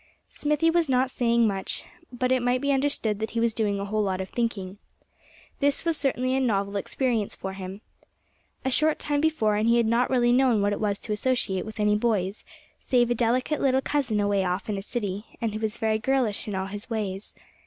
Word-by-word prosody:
Smithy 300 +2 +1
was 335 -3 +2
not 260 0 +2
saying 235 -2 +2
much, 195 -2 -3 0.3
but 250 +1 -1
it 260 -1 +3
might 245 +1 +2
be 280 +1 0
understood 265 -6 0
that 220 0 -2
he 230 - -2
was 230 -1 +2
doing 205 -3 0
a 200 - -3
whole 215 +1 0
lot 190 -2 -1
of 190 0 -4
thinking. 205 -5 -2 0.8
This 285 +2 +1
was 330 -1 +2
certainly 260 -3 0
a - - +2
novel 200 -5 0
experience 225 +1 -1
for 190 0 -5
him. 190 +1 -7 0.8
A 265 - +1
short 310 +4 +2
time 290 -1 -1
before, 300 -10 +2
and 220 +2 +2
he 235 - +5
had 235 - +3
not 235 +3 +2
really 240 -2 +3
known 250 -3 +4
what 205 0 +2
it - - -3
was 205 -2 0
to 215 - -3
associate 210 -4 0
with 220 0 -8
any 210 0 +3
boys 210 -3 0 0.4
save 240 -2 +2
a - - +5
delicate 250 +5 0
little 265 -1 +3
cousin 265 -6 0
away 205 -1 +2
off 180 +1 -2
in 210 - -1
a - - -5
city, 205 -2 -3
and 225 -2 -1
who 215 - -3
was 220 0 -2
very 220 -1 +1
girlish 245 -4 0
in 205 - -3
all 190 0 -1
his 205 +4 -6
ways. 205 -3 -4
225 Hz, 215 wpm, -26 LUFS, 205-255 Hz, 0.8 s, he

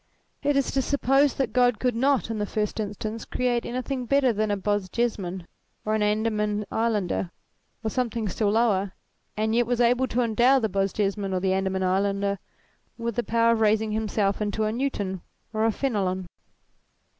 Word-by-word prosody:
It 290 0 +1
is 275 - +1
to 270 - +1
suppose 275 +1 +2
that 270 - -1
God 245 -2 +3
could 250 -2 0
not, 265 -1 +2
in 220 - -3
the 205 - -1
first 210 +1 -2
instance, 215 +1 -4
create 245 -1 -1
anything 255 +1 -3
better 275 -2 +3
than 215 0 0
a 205 - 0
Bosjesman 195 -2 -2 0.4
or 215 - 0
an 220 - +1
Andaman 210 0 0
islander, 210 -6 0 0.5
or 220 - -1
something 235 -3 -1
still 205 +2 0
lower; 205 -3 +2 0.4
and 220 +1 0
yet 240 0 +2
was 245 -1 0
able 245 +2 +3
to 250 - 0
endow 240 +3 +4
the 225 -4 0
Bosjesman 195 0 -1
or - - +1
the 190 0 +1
Andaman 190 0 0
islander 200 +1 0 0.6
with 235 -2 -3
the - - +1
power 230 0 +3
of 230 -1 +1
raising 215 0 +2
himself 210 -2 0
into 210 +1 -1
a 215 - +1
Newton 210 -7 -2 0.3
or 215 0 +1
a 225 - +3
Fenelon. 195 -7 -1
220 Hz, 175 wpm, -25 LUFS, 200-240 Hz, 0.6 s, endow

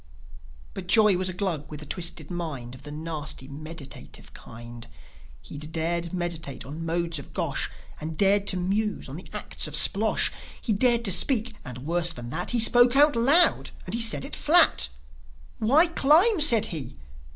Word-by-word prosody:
But - - -8
Joi 210 0 +4
was 185 +1 0
a - - -5
Glug 175 -6 -4
with 150 -1 -9
a - - -9
twisted 170 +4 -3
mind 150 -9 -6
Of 130 - -12
the 145 +1 -10
nasty, 150 -3 -5
meditative 155 +1 -11
kind. 120 +1 -11 0.6
He'd 150 +2 -9 0.4
meditate 170 -6 -5
on 140 - -9
the - - -7
modes 165 -1 -2
of 140 - -13
Gosh, - - -2 0.3
And 155 0 -7
dared 200 0 +2
to 185 - +1
muse 205 +4 -2
on 135 - -9
the 180 - -10
acts - - -3
of - - -6
Splosh; - - +2 0.3
He 225 - -2
dared 235 +2 +2
to 195 - +2
speak, 225 +5 +2
and, 125 +1 -9
worse 170 +1 -1
than 120 -4 -9
that, 175 +4 -3
He 245 - +1
spoke 245 +2 +4
out 290 +1 +5
loud, 280 +10 +4 0.2
and - - -7
he 235 - -1
said 225 -11 +1
it - - -5
flat. 65 -2 +4 0.7
"Why 275 +10 +4
climb?" 335 +5 +3
said 235 -8 +6
he. 135 -5 -7
175 Hz, 175 wpm, -25 LUFS, 150-225 Hz, 0.7 s, said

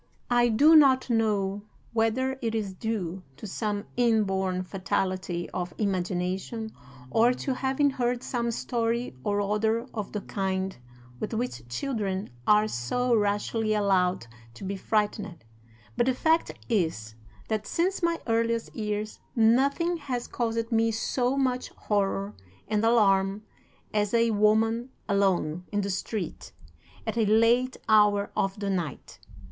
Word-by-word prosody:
III. - - -38 0.3
"'I 240 0 +5
DO 290 +9 +6
not 265 -3 +5
know 205 -3 +1 0.3
whether 235 +4 +1
it 225 -2 -1
is 205 -4 -2
due 190 -3 -3 0.2
to 145 - -9
some 205 0 -3
inborn 195 -6 +1
fatality 185 -2 -2
of 180 -1 -4
imagination, 190 +3 -2 0.4
or 235 +2 +4
to 265 - -2
having 270 +2 +1
heard 245 -1 -1
some 235 -2 -1
story 235 - -1
or 205 0 0
other 220 +3 0
of 210 -3 -4
the 210 - -3
kind 190 -1 -2 0.4
with 220 - -3
which 220 - -3
children 195 - -2 0.2
are 210 0 +5
so 235 - 0
rashly 215 +1 +1
allowed 185 - +2 0.3
to - - -10
be 195 +1 -3
frightened, 205 - -1 0.5
but 240 - +1
the 260 - +2
fact 320 +4 +2 0.2
is, 160 - -1 0.3
that 215 -1 -2
since 370 +4 0
my 335 -1 +1
earliest 230 0 0
years 210 -1 -3 0.2
nothing 275 +9 +3
has 255 -6 -4
caused 230 -1 -2
me 225 0 +3
so 245 +4 0
much 255 -2 0
horror 200 -1 -1 0.3
and 215 0 0
alarm 200 -3 +3 0.5
as 210 +1 +1
a 230 0 +3
woman 220 +3 +2 0.2
alone, 185 -5 +1
in 205 -1 0
the 200 0 -2
street, 190 0 -4 0.5
at 230 +1 -2
a 220 - +3
late 235 +4 +3
hour 210 -2 +4
of 195 +1 -1
the 200 -1 -2
night. 170 -7 -4
215 Hz, 140 wpm, -27 LUFS, 195-235 Hz, 0.5 s, DO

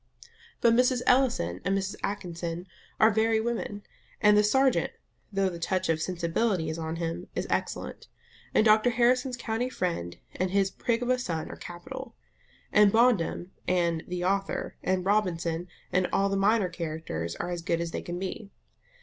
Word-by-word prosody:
But 235 -1 +5
Mrs. 250 +1 +3
Ellison 235 - +2
and 195 +1 +1
Mrs. 195 +1 -2
Atkinson 175 -3 -4 0.3
are 220 +1 +6
very 220 +1 +2
women, 220 -3 -3 0.4
and 210 -1 +6
the 210 - +6
serjeant, 265 +5 +3 0.4
though 195 -1 +1
the 175 -2 -4
touch 185 +2 -1
of 160 -1 +1
"sensibility" 175 +1 0
is 160 - -5
on 160 0 -3
him, 170 +1 -4
is - - -1
excellent; - - -3 0.4
and 215 - +3
Dr 215 +2 +5
Harrison's 245 +2 +2
country 240 +1 -2
friend 170 - -3 0.2
and 185 +1 0
his 195 0 +2
prig 235 0 -1
of 245 - +1
a 255 - +2
son 165 -9 -3
are - - -7
capital; 260 +10 -8 0.6
and 210 -1 +6
Bondum, 215 -6 +2 0.2
and 170 -3 +1
"the 180 0 -3
author," 195 +1 -1
and 185 -1 0
Robinson, 175 -4 0 0.3
and 185 0 +2
all 200 0 +2
the 195 - 0
minor 200 +1 +3
characters, 155 - -4
are 175 - -4
as 175 -1 -3
good 170 -1 0
as 170 -1 -3
they - - -3
can 175 0 -5
be. 190 +2 -5
190 Hz, 170 wpm, -28 LUFS, 170-225 Hz, 0.6 s, are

